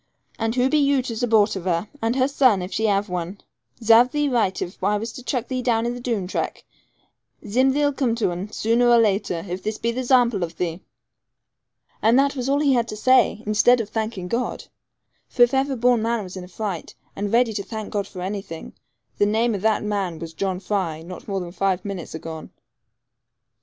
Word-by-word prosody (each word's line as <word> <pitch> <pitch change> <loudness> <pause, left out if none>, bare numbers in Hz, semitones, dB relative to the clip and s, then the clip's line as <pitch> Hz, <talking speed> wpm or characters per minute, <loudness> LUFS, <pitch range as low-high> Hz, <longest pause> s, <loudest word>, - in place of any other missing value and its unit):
And 225 +1 -1
who 250 0 +3
be 305 +2 +2
you 280 -2 +2
to 240 - -4
zupport 220 -2 +2
of 190 -2 -6
her, 175 +2 0
and 225 +2 0
her 260 0 +3
son, 255 -9 +3
if 180 - -7
she 220 0 +1
have 200 0 +1
one? 180 +1 -4 0.4
Zarve 230 +2 +6
thee 295 +2 0
right 220 -7 +1
if 185 +1 -6
I 205 +2 +2
was 225 +2 -5
to 255 - -9
chuck 250 -1 -2
thee 255 -1 -2
down 230 -2 +1
into 240 - -1
the 245 - -7
Doone 230 -6 -1
track. 180 - -4 0.8
Zim 255 +6 +3
thee'll 290 +1 +1
come 255 -4 0
to 225 -6 0
un, 180 +3 -4
zooner 230 +3 +2
or 240 - +6
later, 200 -5 0
if 180 +1 -4
this 215 +2 -3
be 235 - -1
the 250 +2 -3
zample 245 -5 +3
of 170 -1 -4
thee.' 175 0 -3 1.2
And 225 +3 +4
that 280 +1 +3
was 255 0 -2
all 285 +1 +2
he 280 -2 +3
had 235 -2 +1
to 215 - -6
say, 255 -1 +3
instead 215 +4 +4
of 220 -2 -3
thanking 215 -5 -3
God! 235 +6 -2 0.6
For 245 - +4
if 240 - +3
ever 270 0 +1
born 245 -1 +3
man 230 -1 0
was 185 0 -9
in 185 -1 -7
a - - -13
fright, 190 -2 -5 0.2
and 205 0 -3
ready 235 -1 +3
to 205 - -2
thank 220 -1 -6
God 200 -2 -1
for 185 - -9
anything, 190 -4 -6 0.5
the 205 - +4
name 225 +2 +1
of 200 - -3
that 220 0 +1
man 200 -5 -2
was 165 0 -8
John 185 +1 -2
Fry 180 -5 -2
not 180 +2 -10
more 195 -2 -2
than 175 -2 -6
five 190 0 -1
minutes 190 -5 -6
agone. 160 0 -7
220 Hz, 220 wpm, -23 LUFS, 190-245 Hz, 1.2 s, Zarve